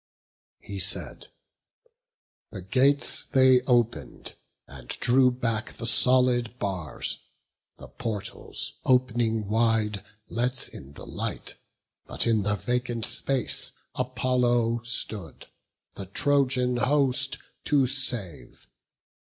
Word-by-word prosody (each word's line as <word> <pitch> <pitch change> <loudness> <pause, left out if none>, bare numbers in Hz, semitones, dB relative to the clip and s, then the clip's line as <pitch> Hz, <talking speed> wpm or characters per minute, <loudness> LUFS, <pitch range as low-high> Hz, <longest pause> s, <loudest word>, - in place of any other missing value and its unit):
He - - -7
said; - - -2 1.2
the 100 -4 -8
gates 135 +8 +3
they 130 -2 +4
open'd, 120 - -1 0.3
and 65 -3 -13
drew 125 - +3
back 115 -3 -3
The 115 - -7
solid 125 -1 +4
bars; 95 -8 -3 0.6
the - - -12
portals, 110 -4 -5
op'ning 120 -4 +1
wide, 110 -2 +1 0.2
Let 125 +2 -1
in 70 +1 -12
the - - -11
light; - - -4 0.5
but - - +1
in 115 -2 +2
the 105 +1 0
vacant 120 0 -2
space 135 -3 -1 0.2
Apollo 125 -2 0
stood, 105 -7 -3 0.5
the 95 - -8
Trojan 125 +2 +1
host 135 0 +1 0.3
to 140 -3 +3
save. 120 - -2
120 Hz, 100 wpm, -26 LUFS, 110-130 Hz, 1.2 s, they